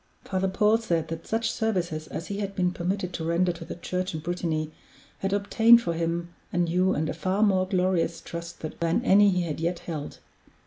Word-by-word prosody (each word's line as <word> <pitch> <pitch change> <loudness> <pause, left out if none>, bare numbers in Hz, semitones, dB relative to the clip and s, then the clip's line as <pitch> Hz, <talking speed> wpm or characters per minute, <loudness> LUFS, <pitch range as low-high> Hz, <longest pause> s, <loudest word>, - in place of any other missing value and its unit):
Father 190 0 0
Paul 210 +3 +3
said 170 -8 -1
that 165 0 -6
such 225 0 0
services 175 -8 -1
as 165 - -5
he 200 +1 -4
had 200 -1 -3
been 180 -1 +1
permitted 180 +1 -2
to 165 - -4
render 170 +2 +2
to 170 0 -8
the - - -7
Church 180 +1 -3
in - - -2
Brittany 160 -2 -2 0.5
had 195 - -1
obtained 225 +4 +6
for 170 - -1
him 170 +1 -2 0.2
a - - -3
new 175 +2 +2
and 155 +1 0
a - - -2
far 185 +5 0
more 190 -3 +3
glorious 180 -3 +1
trust 170 0 -8
than 165 +8 -1
any 205 0 +6
he 180 -2 +1
had 160 -3 -4
yet 170 +2 -1
held. 155 -4 -6
180 Hz, 205 wpm, -26 LUFS, 165-195 Hz, 0.5 s, obtained